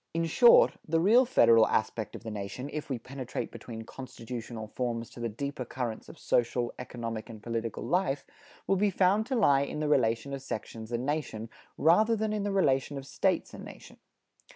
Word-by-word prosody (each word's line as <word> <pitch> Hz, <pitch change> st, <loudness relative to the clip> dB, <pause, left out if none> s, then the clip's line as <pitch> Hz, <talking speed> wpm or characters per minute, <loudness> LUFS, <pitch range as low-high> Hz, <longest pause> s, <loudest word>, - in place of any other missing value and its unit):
In 165 Hz, 0 st, +1 dB
short, 480 Hz, -, +6 dB
the 165 Hz, +1 st, +2 dB
real 225 Hz, +9 st, +5 dB
federal 115 Hz, -, +5 dB
aspect 110 Hz, -1 st, -1 dB
of -, -, -9 dB
the 110 Hz, -, -5 dB
nation, 105 Hz, +7 st, -5 dB
if 150 Hz, -1 st, -5 dB
we 130 Hz, -, -1 dB
penetrate 130 Hz, +1 st, -6 dB
beneath 115 Hz, -2 st, -8 dB
constitutional 120 Hz, -3 st, -7 dB
forms 115 Hz, -1 st, -3 dB
to -, -, -12 dB
the 120 Hz, 0 st, -2 dB
deeper 140 Hz, +4 st, -4 dB
currents 120 Hz, -2 st, -5 dB
of -, -, -12 dB
social, 120 Hz, 0 st, 0 dB
economic 115 Hz, -2 st, -5 dB
and 110 Hz, -2 st, -10 dB
political 115 Hz, -1 st, -3 dB
life, 170 Hz, -6 st, 0 dB, 0.4 s
will 195 Hz, -, +2 dB
be 205 Hz, +2 st, +3 dB
found 195 Hz, +4 st, +2 dB
to 265 Hz, -, -1 dB
lie 140 Hz, -, +4 dB
in 140 Hz, +2 st, -3 dB
the 155 Hz, -, -1 dB
relation 125 Hz, -1 st, +1 dB
of 135 Hz, -, -4 dB
sections 110 Hz, -3 st, -6 dB
and 120 Hz, +1 st, -2 dB
nation, 135 Hz, -7 st, -3 dB, 0.3 s
rather 215 Hz, +8 st, +4 dB
than 215 Hz, 0 st, -1 dB
in 210 Hz, -, -1 dB
the 205 Hz, 0 st, -1 dB
relation 145 Hz, -7 st, +1 dB
of 135 Hz, -, -7 dB
States -, -, 0 dB
and -, -, -9 dB
nation. -, -, -12 dB
130 Hz, 190 wpm, -29 LUFS, 115-165 Hz, 0.4 s, short